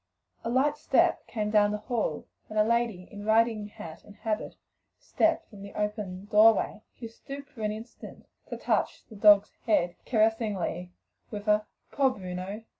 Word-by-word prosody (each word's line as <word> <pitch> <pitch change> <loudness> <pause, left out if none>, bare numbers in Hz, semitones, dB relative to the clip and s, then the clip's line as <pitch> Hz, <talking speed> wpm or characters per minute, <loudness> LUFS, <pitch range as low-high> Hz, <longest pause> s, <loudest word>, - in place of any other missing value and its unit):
A 230 - -2
light 280 +5 +2
step - - +2
came 210 -2 -2
down 210 -1 +5
the 210 - -1
hall, 215 - -2 0.2
and 215 - -5
a 210 - +6
lady 230 -5 0
in 205 0 -8
riding 220 -1 +2
hat 165 -5 -10
and 205 - -15
habit 215 0 -3 0.4
stepped 325 0 +1
from 205 -3 -13
the 200 0 -10
open 210 -3 -3
doorway, 215 0 +4 0.3
stooped 275 +5 -10
for 235 - -11
an 210 -1 0
instant 220 +3 -10 0.2
to - - -4
touch - - -1
the 220 - -11
dog's 205 0 +6 0.2
head 175 -5 +2
caressingly 215 -6 0 0.4
with 210 -1 -7
a 210 0 +3 0.2
"Poor 275 -1 +3
Bruno! 190 -1 -6
210 Hz, 160 wpm, -28 LUFS, 205-225 Hz, 0.4 s, a